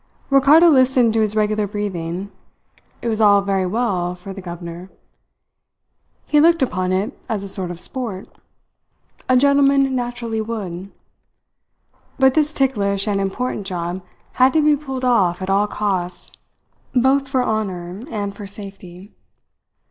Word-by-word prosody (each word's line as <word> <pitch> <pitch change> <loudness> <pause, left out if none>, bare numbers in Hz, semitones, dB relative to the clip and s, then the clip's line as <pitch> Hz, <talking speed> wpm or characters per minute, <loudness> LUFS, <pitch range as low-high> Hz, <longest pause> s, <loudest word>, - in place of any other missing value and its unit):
Ricardo 285 +5 +6
listened 255 -5 +4
to 225 - +2
his 215 -1 0
regular 215 -1 +1
breathing. 190 -2 -4 0.7
It - - -2
was 220 -1 0
all 205 -1 +6
very 195 -2 0
well 180 -4 -1
for 185 +2 -9
the 195 - -8
governor. 175 0 -8 1.4
He 300 - +3
looked 330 -1 +4
upon 185 -6 -1
it 190 +3 -1
as 210 -3 -2
a - - -6
sort 190 -2 -4
of 175 -1 -6
sport. 220 -4 -4 1.0
A 255 - +5
gentleman 275 0 +3
naturally 240 -2 -3
would. 200 -4 -6 1.3
But 265 -1 +4
this 305 0 +2
ticklish 205 -8 0
and 200 -1 0
important 200 +1 -3
job 175 0 -4 0.3
had 260 +1 +3
to 315 - +3
be 300 -1 +5
pulled 265 -3 -5
off 190 -8 +2
at 190 0 -3
all 200 +2 +2
costs, 185 -4 -3 0.6
both 265 +2 +3
for 260 -2 0
honour 190 -4 -3
and 205 -4 -4
for 205 -1 -8
safety. 195 -1 -9
210 Hz, 140 wpm, -20 LUFS, 190-255 Hz, 1.4 s, Ricardo